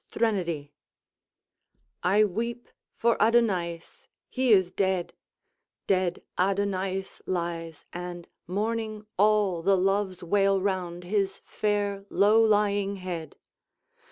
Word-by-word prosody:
THRENODY 170 -10 -1 1.3
I 200 +4 +4
weep 230 +4 -2 0.3
for 235 0 +2
Adonaïs 195 -7 +1 0.2
he 255 -2 +1
is 185 -4 +5
dead! 190 -2 0 0.7
Dead 185 -2 0 0.2
Adonaïs 195 0 -1
lies, 170 -3 -3
and 175 -1 -6 0.2
mourning 215 +2 -2
all, 205 -4 +3
The 195 +3 +3
Loves 190 -1 0
wail 195 +2 +3
round 180 -3 -2
his 195 +1 -1
fair, 205 -1 -1
low 210 +3 +4
lying 205 -2 +2
head. 180 -4 -6
195 Hz, 100 wpm, -27 LUFS, 180-210 Hz, 1.3 s, is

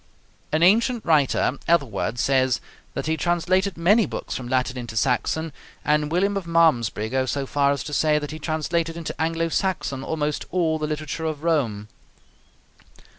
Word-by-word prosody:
An 155 +2 +2
ancient 230 +5 +3
writer, 145 -3 +2
Ethelwerd, 120 - +1
says 130 0 +2 0.4
that - - -3
he 160 0 +1
translated 175 +3 0
many 205 +6 +4
books - - -5
from 125 - -5
Latin 130 +1 0
into 120 -3 -6
Saxon, 140 +6 0 0.3
and 150 0 +1
William 195 +4 +1
of 195 -4 -3
Malmesbury 150 -11 +2
goes 130 +2 -1
so 140 -1 -1
far 140 +1 +2
as 140 -3 -2
to 150 - -7
say 150 0 +3
that 150 0 -4
he 155 - -7
translated 165 +2 -1
into 165 - -4
Anglo 165 +1 0
Saxon 160 -7 -1
almost 150 0 -2
all 165 -3 0
the 155 - -2
literature 155 +1 -4
of 155 -1 -3
Rome. 120 -11 0
155 Hz, 165 wpm, -23 LUFS, 135-170 Hz, 0.4 s, many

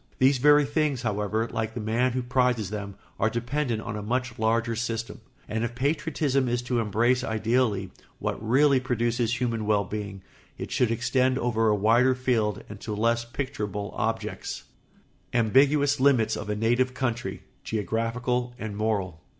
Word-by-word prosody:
These 130 0 +4
very 145 +2 +6
things, 145 -3 0
however, 110 0 -1
like 110 0 -3
the - - -3
man 115 +3 +1
who 125 0 -1
prizes 125 -5 +1
them, 100 -2 -5 0.2
are 110 - +3
dependent 120 0 -2
on 115 -2 -5
a 105 - -4
much 125 +2 -2
larger 115 +1 +1
system; 115 0 -4 0.3
and 110 +1 -2
if 120 0 -3
patriotism 140 -1 0
is 120 0 -1
to 125 -1 0
embrace 115 +4 +2
ideally 110 -4 0 0.3
what - - -3
really 135 +4 +4
produces 120 -1 0
human 115 -4 -1
well 105 -1 +3
being 100 -2 -6 0.3
it - - -6
should 125 - +2
extend 125 +3 +1
over 115 -3 +1
a 105 - +3
wider 115 +5 +4
field 115 -5 0
and 105 -1 -9
to 105 0 -4
less 115 +2 +1
picturable 105 -6 -4
objects. 115 -1 -3 0.7
[Sidenote: 120 -1 +2
Ambiguous 145 +3 +4
limits 125 -5 +3
of 105 - -6
a 105 - 0
native 120 +4 +1
country, 120 -3 -3 0.2
geographical 120 +3 -2
and 110 -4 -5
moral. 100 -6 -1
115 Hz, 160 wpm, -26 LUFS, 110-130 Hz, 0.7 s, very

